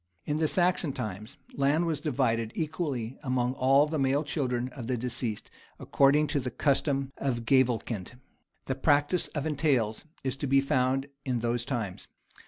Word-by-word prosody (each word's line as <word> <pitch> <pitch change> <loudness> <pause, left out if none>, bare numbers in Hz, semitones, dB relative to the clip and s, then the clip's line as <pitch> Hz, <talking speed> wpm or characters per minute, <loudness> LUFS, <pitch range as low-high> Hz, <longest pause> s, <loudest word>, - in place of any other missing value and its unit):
In 150 - -1
the 155 0 +2
Saxon 175 -3 +1
times, 110 -2 -6 0.2
land 145 +5 +2
was 160 -4 -1
divided 115 -7 0
equally 145 -7 -3
among 125 -2 0
all 135 +2 +4
the 155 0 -2
male 135 +2 +2
children 125 -5 -1
of 125 -3 -8
the 125 -1 0
deceased, 120 -2 -2 0.3
according 140 +2 +3
to 145 - +2
the 125 -1 -3
custom 135 +1 0
of 120 -4 -2
gavelkind. 120 -5 +1 0.5
The 130 - -1
practice 145 +5 +2
of 150 -1 -4
entails 140 -8 0 0.2
is 130 -1 -1
to 140 - -3
be 135 +1 +5
found 135 -1 +1 0.2
in 125 -3 -1
those 120 0 -1
times. 115 -8 -4
135 Hz, 160 wpm, -28 LUFS, 120-145 Hz, 0.5 s, be